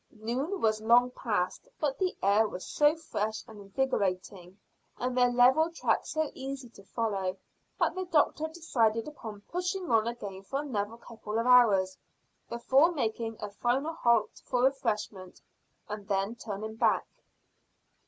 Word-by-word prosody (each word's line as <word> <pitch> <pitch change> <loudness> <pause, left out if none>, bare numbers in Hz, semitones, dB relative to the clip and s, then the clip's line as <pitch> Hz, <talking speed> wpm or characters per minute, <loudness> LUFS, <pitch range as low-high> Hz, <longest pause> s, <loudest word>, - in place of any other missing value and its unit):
Noon 250 - -3
was 215 -1 +2
long 240 +3 +5
past, 205 -8 -2
but 285 -3 -1
the 370 -2 0
air 205 +3 +4
was 185 -3 -7
so 295 +1 +3
fresh 220 -9 -3
and 220 -2 -12
invigorating 195 -4 -2 0.4
and 250 0 -2
their 250 -1 +4
level 255 +7 +5
track 335 - 0
so 315 -2 -1
easy 270 -1 -6
to 200 -3 -16
follow, 195 -3 -2 0.4
that - - +2
the 370 0 -3
doctor 315 -2 +2
decided 235 -9 0
upon 220 -9 -8
pushing 360 - -3
on 225 -1 +4
again 200 -5 -5
for 270 +8 -3
another 225 -6 -3
couple 225 -2 -6
of 230 - 0
hours, 210 -7 +5 0.5
before 265 +7 +3
making 225 -6 -2
a 210 - -5
final 255 +9 0
halt 235 -8 +1
for 245 0 0
refreshment, 215 -8 -1 0.5
and 210 -1 -6
then 195 +1 0
turning 220 -1 -6
back. 230 - +2
230 Hz, 145 wpm, -30 LUFS, 210-270 Hz, 0.5 s, long